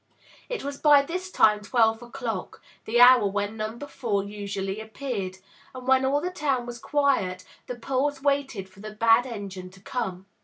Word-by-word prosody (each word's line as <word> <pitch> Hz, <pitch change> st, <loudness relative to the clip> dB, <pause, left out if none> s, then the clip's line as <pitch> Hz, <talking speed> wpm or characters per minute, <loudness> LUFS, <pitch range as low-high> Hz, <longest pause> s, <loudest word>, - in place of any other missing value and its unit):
It -, -, -4 dB
was 280 Hz, 0 st, -5 dB
by 290 Hz, -2 st, +6 dB
this 365 Hz, +5 st, -5 dB
time 210 Hz, -, +4 dB
twelve 225 Hz, 0 st, +2 dB
o'clock, 240 Hz, -5 st, -5 dB, 0.3 s
the 235 Hz, +2 st, +1 dB
hour 245 Hz, -3 st, +8 dB
when 205 Hz, +2 st, -2 dB
Number 225 Hz, +5 st, -5 dB
Four 230 Hz, -8 st, -2 dB
usually 200 Hz, 0 st, -4 dB
appeared, 220 Hz, -4 st, -5 dB, 0.4 s
and 255 Hz, 0 st, -9 dB
when 265 Hz, 0 st, +4 dB
all 280 Hz, +2 st, +1 dB
the 360 Hz, +2 st, -3 dB
town 275 Hz, -8 st, -1 dB
was 240 Hz, 0 st, -7 dB
quiet 230 Hz, -11 st, 0 dB, 0.2 s
the 250 Hz, -, -4 dB
poles 270 Hz, +4 st, -1 dB
waited 275 Hz, -8 st, -1 dB
for 190 Hz, 0 st, -20 dB
the 215 Hz, +1 st, -8 dB
bad 230 Hz, +3 st, +4 dB
engine 195 Hz, -5 st, -7 dB
to 190 Hz, +1 st, -17 dB
come. 190 Hz, -4 st, -4 dB
235 Hz, 175 wpm, -26 LUFS, 205-275 Hz, 0.4 s, hour